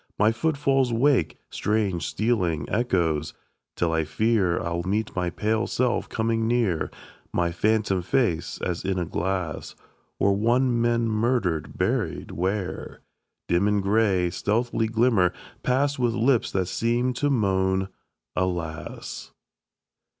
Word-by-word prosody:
My 105 Hz, +2 st, +4 dB
footfalls 135 Hz, 0 st, +1 dB
wake 115 Hz, -, +2 dB
Strange 100 Hz, -5 st, 0 dB
stealing 90 Hz, -9 st, 0 dB
echoes, 85 Hz, -9 st, 0 dB, 0.4 s
till 85 Hz, -1 st, 0 dB
I 80 Hz, 0 st, +2 dB
fear 100 Hz, +1 st, +1 dB
I'll 85 Hz, -1 st, -2 dB
meet 100 Hz, +5 st, -2 dB
my 90 Hz, -1 st, 0 dB
pale 110 Hz, +5 st, 0 dB
self 125 Hz, -1 st, 0 dB
coming 115 Hz, 0 st, 0 dB
near; 115 Hz, -8 st, +1 dB, 0.4 s
My 85 Hz, -1 st, 0 dB
phantom 105 Hz, +1 st, +1 dB
face 90 Hz, -3 st, 0 dB
as 90 Hz, -2 st, -2 dB
in 95 Hz, -1 st, -1 dB
a 90 Hz, -, 0 dB
glass; 85 Hz, -2 st, -3 dB, 0.4 s
Or 100 Hz, -, +3 dB
one 120 Hz, +3 st, +2 dB
men 120 Hz, 0 st, +2 dB
murdered, 110 Hz, -, 0 dB
buried -, -, -1 dB
where? 95 Hz, +3 st, -3 dB, 0.5 s
Dim 90 Hz, +4 st, +2 dB
in 105 Hz, 0 st, +2 dB
gray, 100 Hz, -3 st, +2 dB
stealthy 115 Hz, +4 st, 0 dB
glimmer, 110 Hz, -6 st, +3 dB, 0.3 s
pass 140 Hz, +2 st, +1 dB
With 120 Hz, -2 st, +1 dB
lips 120 Hz, +1 st, +2 dB
that 95 Hz, -1 st, 0 dB
seem 120 Hz, +6 st, 0 dB
to 145 Hz, +4 st, 0 dB
moan 95 Hz, -6 st, +1 dB, 0.5 s
"Alas." 85 Hz, -3 st, -4 dB
105 Hz, 125 wpm, -25 LUFS, 90-120 Hz, 0.5 s, My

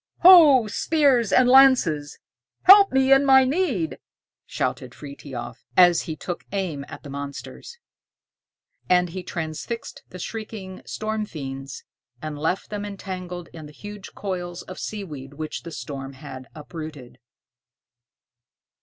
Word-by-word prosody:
"Ho, 320 Hz, -9 st, +8 dB
spears 255 Hz, -1 st, +2 dB
and 255 Hz, -1 st, +5 dB
lances, 250 Hz, -, +4 dB, 0.5 s
help 395 Hz, +1 st, +8 dB
me 265 Hz, 0 st, +4 dB
in 270 Hz, +1 st, +5 dB
my 265 Hz, -1 st, +6 dB
need!" 255 Hz, -, -1 dB, 0.5 s
shouted -, -, -3 dB
Frithiof, 130 Hz, -4 st, -9 dB
as 175 Hz, -2 st, +6 dB
he 160 Hz, -, -3 dB
took 175 Hz, +3 st, -6 dB
aim 180 Hz, -8 st, -3 dB
at -, -, -10 dB
the 145 Hz, -, -10 dB
monsters. 140 Hz, -, -8 dB, 1.1 s
And 180 Hz, -1 st, +3 dB
he 185 Hz, +2 st, -6 dB
transfixed 170 Hz, +7 st, -6 dB
the 185 Hz, -, -10 dB
shrieking 205 Hz, -1 st, -7 dB
storm 215 Hz, 0 st, -3 dB
fiends, 135 Hz, -4 st, -7 dB, 0.4 s
and 155 Hz, 0 st, -6 dB
left 170 Hz, +7 st, -2 dB
them 205 Hz, -1 st, -4 dB
entangled 185 Hz, -3 st, -7 dB
in 155 Hz, -2 st, -9 dB
the -, -, -13 dB
huge 205 Hz, +3 st, -10 dB
coils 180 Hz, -3 st, -5 dB
of 185 Hz, -, -10 dB
seaweed 150 Hz, -10 st, -7 dB
which 155 Hz, +1 st, -5 dB
the 170 Hz, -, -9 dB
storm 135 Hz, -3 st, -7 dB
had 130 Hz, -2 st, -10 dB
uprooted. 150 Hz, -5 st, -9 dB
180 Hz, 130 wpm, -23 LUFS, 150-225 Hz, 1.1 s, Ho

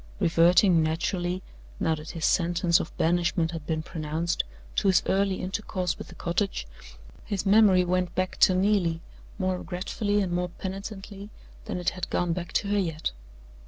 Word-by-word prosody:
Reverting 170 Hz, +1 st, +5 dB
naturally, 175 Hz, +3 st, -1 dB, 0.4 s
now 160 Hz, -, +2 dB
that 155 Hz, 0 st, -6 dB
his 165 Hz, -2 st, -3 dB
sentence 170 Hz, 0 st, +3 dB
of -, -, -6 dB
banishment 170 Hz, -1 st, +1 dB
had 160 Hz, -3 st, -7 dB
been 155 Hz, -1 st, -1 dB
pronounced, 160 Hz, +1 st, -2 dB, 0.3 s
to -, -, +2 dB
his 190 Hz, -, +4 dB
early 195 Hz, 0 st, +2 dB
intercourse 185 Hz, -2 st, -2 dB
with -, -, -7 dB
the -, -, -13 dB
cottage, 180 Hz, -, -1 dB, 0.6 s
his 200 Hz, -2 st, -3 dB
memory 195 Hz, -3 st, +5 dB
went 180 Hz, 0 st, 0 dB
back 185 Hz, 0 st, -1 dB
to 185 Hz, -, +5 dB
Neelie, 185 Hz, -4 st, +2 dB, 0.4 s
more 185 Hz, -2 st, -1 dB
regretfully 195 Hz, +4 st, -2 dB
and 190 Hz, -3 st, -1 dB
more 180 Hz, 0 st, -1 dB
penitently 195 Hz, +2 st, -7 dB, 0.4 s
than 215 Hz, -4 st, -3 dB
it 180 Hz, -, 0 dB
had 180 Hz, -, -5 dB
gone 175 Hz, -1 st, 0 dB
back 175 Hz, 0 st, -5 dB
to 200 Hz, -, +1 dB
her 205 Hz, 0 st, +2 dB
yet. 165 Hz, -4 st, -2 dB
180 Hz, 160 wpm, -27 LUFS, 170-195 Hz, 0.6 s, Reverting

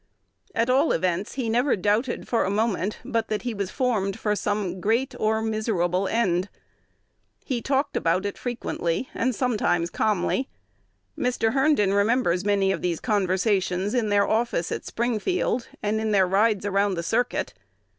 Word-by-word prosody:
At 230 Hz, +1 st, +2 dB
all 270 Hz, +5 st, +3 dB
events, 180 Hz, +2 st, -1 dB
he 260 Hz, -4 st, -2 dB
never 245 Hz, +5 st, +2 dB
doubted 210 Hz, +6 st, 0 dB
for 235 Hz, -, +1 dB
a -, -, -1 dB
moment 210 Hz, -1 st, 0 dB
but 230 Hz, -1 st, -1 dB
that 215 Hz, 0 st, -2 dB
he 245 Hz, -2 st, -2 dB
was 200 Hz, -3 st, -3 dB
formed 215 Hz, -7 st, -1 dB
for 210 Hz, -1 st, 0 dB
"some 205 Hz, -3 st, -2 dB
great 230 Hz, +7 st, +1 dB
or 220 Hz, +1 st, +1 dB
miserable 195 Hz, -4 st, 0 dB
end." 190 Hz, -4 st, +1 dB, 1.0 s
He 250 Hz, -4 st, -2 dB
talked 275 Hz, +3 st, 0 dB
about 170 Hz, +4 st, +1 dB
it 200 Hz, -, -3 dB
frequently 240 Hz, -4 st, -3 dB
and 255 Hz, -2 st, 0 dB
sometimes 205 Hz, -9 st, 0 dB
calmly. 215 Hz, +5 st, 0 dB, 0.7 s
Mr. 245 Hz, -3 st, 0 dB
Herndon 270 Hz, -8 st, +3 dB
remembers 200 Hz, -3 st, +2 dB
many 200 Hz, -1 st, +2 dB
of -, -, -2 dB
these 175 Hz, -2 st, -1 dB
conversations 190 Hz, -2 st, 0 dB
in 235 Hz, -4 st, +1 dB
their 200 Hz, 0 st, +3 dB
office 220 Hz, -6 st, 0 dB
at -, -, -4 dB
Springfield, 240 Hz, -, -1 dB, 0.2 s
and 215 Hz, +1 st, 0 dB
in 220 Hz, -, -1 dB
their 195 Hz, -3 st, +4 dB
rides 205 Hz, +2 st, +2 dB
around 200 Hz, -1 st, +1 dB
the 170 Hz, -, -3 dB
circuit. 235 Hz, +7 st, -1 dB
210 Hz, 155 wpm, -25 LUFS, 190-235 Hz, 1.0 s, their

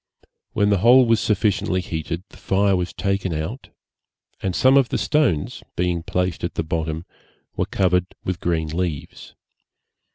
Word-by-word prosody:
When 100 Hz, 0 st, +2 dB
the 100 Hz, -, +3 dB
hole 125 Hz, +5 st, +7 dB
was 115 Hz, -1 st, +3 dB
sufficiently 100 Hz, -3 st, +1 dB
heated, 85 Hz, 0 st, -4 dB
the -, -, -16 dB
fire 100 Hz, 0 st, +2 dB
was 90 Hz, -1 st, -2 dB
taken 100 Hz, -2 st, -1 dB
out, 80 Hz, -, -5 dB, 0.7 s
and 95 Hz, -2 st, -2 dB
some 130 Hz, +1 st, +5 dB
of 135 Hz, -3 st, +4 dB
the -, -, 0 dB
stones, 135 Hz, -, 0 dB
being 90 Hz, -1 st, 0 dB
placed 90 Hz, +1 st, -2 dB
at 85 Hz, -, -3 dB
the 80 Hz, -, -1 dB
bottom, 80 Hz, 0 st, -3 dB, 0.5 s
were -, -, -1 dB
covered 90 Hz, -1 st, +1 dB, 0.2 s
with 90 Hz, -2 st, -3 dB
green 80 Hz, -2 st, -1 dB
leaves. 80 Hz, -3 st, -4 dB
90 Hz, 155 wpm, -22 LUFS, 85-100 Hz, 0.7 s, hole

